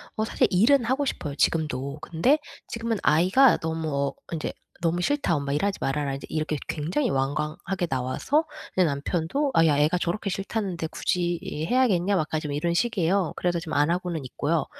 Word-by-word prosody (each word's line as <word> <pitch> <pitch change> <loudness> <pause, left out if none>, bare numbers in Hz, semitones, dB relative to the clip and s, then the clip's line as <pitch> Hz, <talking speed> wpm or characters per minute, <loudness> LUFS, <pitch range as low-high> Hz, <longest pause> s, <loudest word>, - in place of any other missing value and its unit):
어 220 - 0
사실 - - +2
일은 235 +8 +4
하고 265 +4 +1
싶어요, 150 - -3
지금도. 145 -3 0
근데 245 - +2 0.3
지금은 230 -1 -2
아이가 190 - +5
너무 160 0 -3 0.2
어 140 - -4 0.2
인제 160 - -2 0.3
"너무 175 +1 +1
싫다. 285 - +1
엄마 140 -1 -2
일하지 195 +7 0
말아라." 140 0 -1
이제 135 - -8
이렇게 155 -1 -1
굉장히 175 - -1
완강하게 150 +7 -1
나와서 135 - 0 0.3
이제 185 -2 +4
남편도 165 - -1
"아 165 - +5
야 145 -2 +3
애가 155 +5 +3
저렇게 180 +4 -2
싫다는데 195 -4 -3
굳이 175 +1 -1
일 155 +2 -4
해야겠냐?" 205 -7 +3
약간 155 -1 -1
좀 150 -2 -4
이런 170 +4 0
식이에요. 190 -3 +1
그래서 175 -1 0
지금 165 -1 -6
안 145 +3 +3
하고는 175 -4 -2
있고요. 145 +4 -1
170 Hz, 395 characters per minute, -26 LUFS, 150-200 Hz, 0.3 s, 아이가